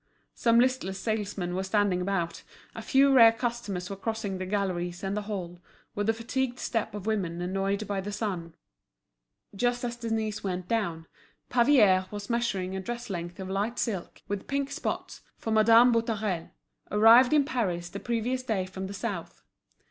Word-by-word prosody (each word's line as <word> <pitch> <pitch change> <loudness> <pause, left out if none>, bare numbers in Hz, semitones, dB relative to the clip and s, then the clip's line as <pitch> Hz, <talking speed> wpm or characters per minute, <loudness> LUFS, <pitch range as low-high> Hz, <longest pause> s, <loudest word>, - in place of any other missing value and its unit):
Some 230 0 +3
listless 250 -6 +1
salesmen 205 -4 -2
were 185 - -1
standing 190 -1 +1
about, 180 -3 -2 0.3
a - - -6
few 275 0 +4
rare 230 -3 +9
customers 230 -6 -3
were 195 - -5
crossing 200 -1 -3
the 185 - -4
galleries 180 -3 -2
and 195 +1 -1
the 210 - -1
hall, 180 -4 -6 0.3
with 205 0 -2
the 225 - +4
fatigued 245 +2 -2
step 220 -3 -2
of 205 -2 -6
women 190 -6 -1
annoyed 195 +3 -1
by 200 -1 -2
the 205 +2 -5
sun. 185 -6 -4 1.0
Just 245 +3 0
as 240 -1 -2
Denise 225 -2 -2
went 180 -2 -3
down, 170 -8 -1 0.5
Pavier 220 -8 +5
was 205 +3 -6
measuring 195 -6 -1
a - - -2
dress 235 +2 -5
length 175 0 -5
of 190 - -5
light 205 +5 -2
silk, 195 -7 -3
with 205 -1 -4
pink 280 0 -1
spots, - - -4 0.2
for 225 - -4
Madame 225 +3 +6
Boutarel, 215 -7 -1 0.4
arrived 230 +4 +7
in 295 -2 +4
Paris 190 - -1
the 195 +3 -7
previous 240 +3 -1
day 220 -7 -1
from 190 +1 -6
the 200 - -7
South. 200 -5 -5
205 Hz, 170 wpm, -28 LUFS, 190-235 Hz, 1.0 s, rare